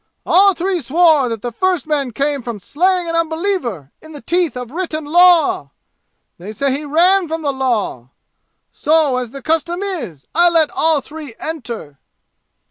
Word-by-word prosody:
All 390 +1 +5
three 360 0 -1
swore 300 -1 +3
that 225 -3 -5
the 240 - -3
first 365 +6 0
man 295 -4 -1
came 280 +3 -1
from 235 -3 -6
slaying 360 - 0
an 330 - -2
unbeliever 320 - -2
in 315 0 -13
the 290 - -9
teeth 345 -6 0
of 250 -1 -7
written 315 -2 -4
law. 335 - +4 0.7
They 200 +5 -8
said 275 +5 0
he 290 +3 -4
ran 350 +5 +3
from 320 0 -4
the 285 -2 0
law. 230 - -2 0.6
So, 305 -4 +2
as 250 -2 -3
the 275 +2 -10
custom 335 +5 -1
is, 240 - -6
I 345 +1 +5
let 325 -3 +2
all 315 -3 +1
three 295 -6 -10
enter!" 235 - -7
310 Hz, 165 wpm, -17 LUFS, 250-345 Hz, 0.7 s, All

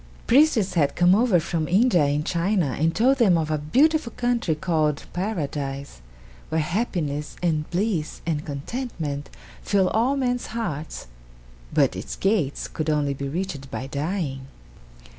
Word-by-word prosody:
Priests 245 -8 +4
had 150 -5 +2
come 175 +1 +5
over 215 -3 +4
from 160 -1 -2
India 185 - +4
and 145 +2 0
China 170 -5 0
and 165 +2 +1
told 260 +4 +4
them 195 -8 +5
of 155 -1 -1
a 155 - 0
beautiful 265 - +2
country 240 -9 +1
called 155 -3 0
Paradise, 140 - -3 0.5
where 160 - 0
happiness 155 -4 -2
and 155 -3 0
bliss 180 -4 -1
and 155 -3 -1
contentment 145 - -4 0.3
fill 195 -2 +2
all 245 +6 +1
men's 245 -2 -1
hearts, 155 -9 -4 0.7
but - - +2
its - - -5
gates 190 -9 0
could 155 0 -3
only 145 -2 +1
be 140 0 -4
reached 150 -4 -4
by 130 - -4
dying. 140 -2 -3
165 Hz, 140 wpm, -24 LUFS, 150-215 Hz, 0.7 s, come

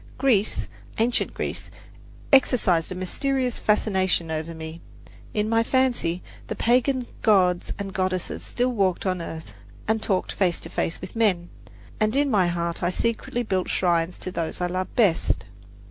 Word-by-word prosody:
Greece, 240 -6 +2 0.3
ancient 235 +2 +2
Greece, - - -4 0.6
exercised 200 -11 +4
a - - -3
mysterious 255 +7 -1
fascination 190 -5 +1
over 160 +1 -3
me. 160 +1 -7 0.5
In 210 0 +1
my 225 +1 +3
fancy 235 -9 +1 0.2
the - - -3
pagan 250 +2 +2 0.2
gods 185 -5 +3
and 195 -1 -5
goddesses 185 -1 -2
still 250 +1 0
walked 195 -6 +1
on 185 -2 0
earth 160 -9 -7 0.3
and 220 0 +1
talked 190 -4 0
face 180 -4 +1
to - - -8
face 165 - -2
with 185 - -8
men, 190 -7 +2 0.5
and 215 +2 +2
in 285 0 +2
my 190 -5 +4
heart 170 -1 -2
I 175 - +2
secretly 230 +4 -1
built 190 -4 -1
shrines 175 -1 +1
to 185 - -4
those 165 -3 -3
I 180 - 0
loved 185 +1 -3
best. 200 -9 +2
190 Hz, 155 wpm, -25 LUFS, 175-230 Hz, 0.6 s, exercised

